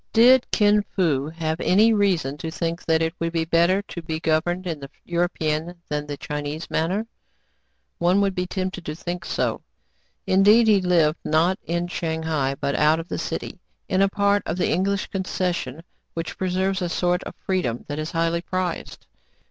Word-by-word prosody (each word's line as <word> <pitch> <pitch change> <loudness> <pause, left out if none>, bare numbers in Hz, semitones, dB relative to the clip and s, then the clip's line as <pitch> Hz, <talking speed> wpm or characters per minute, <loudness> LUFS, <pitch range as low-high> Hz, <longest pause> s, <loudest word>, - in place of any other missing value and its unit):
Did 245 +3 +6
Kin 210 -1 +4
Fo 150 -6 +1
have 160 0 -3
any 215 +5 +5
reason 180 -10 +1
to 160 - -4
think 165 +2 -3
that 160 0 +2
it 160 0 -1
would 165 0 -1
be 165 -1 0
better 170 +4 +3
to 175 - -8
be 160 -1 -4
governed 175 +3 0
in 165 -4 -3
the 140 -1 -9 0.2
European 170 -1 -1
than 150 0 -2
in - - -18
the 145 -1 -5
Chinese 150 +2 -5
manner.? 185 +7 0 0.9
One 180 +3 +3
would 200 -1 +1
be 180 0 -2
tempted 185 -1 -3
to 150 - -5
think 175 +2 -5
so. - - -1 0.6
Indeed, 205 +5 +5
he 205 -3 +5
lived, 170 -3 +3
not 165 +5 +2
in 170 +1 -1
Shang 160 -2 -3
hai, 140 -4 0
but 140 - -1
out 155 +2 +3
of 165 - -7
the - - -3
city, - - -4 0.3
in 190 0 +1
a 195 - +4
part 200 +1 +2
of 175 - -2
the 180 - +1
English 200 +2 +1
concession, 180 -6 -3 0.3
which 165 -1 -4
preserves 190 +1 0
a 175 - -1
sort 180 +1 +1
of - - -7
freedom 175 -12 -2
that 145 +1 -4
is 155 +1 -3
highly 165 0 0
prized. 185 0 -4
170 Hz, 185 wpm, -23 LUFS, 160-190 Hz, 0.9 s, Did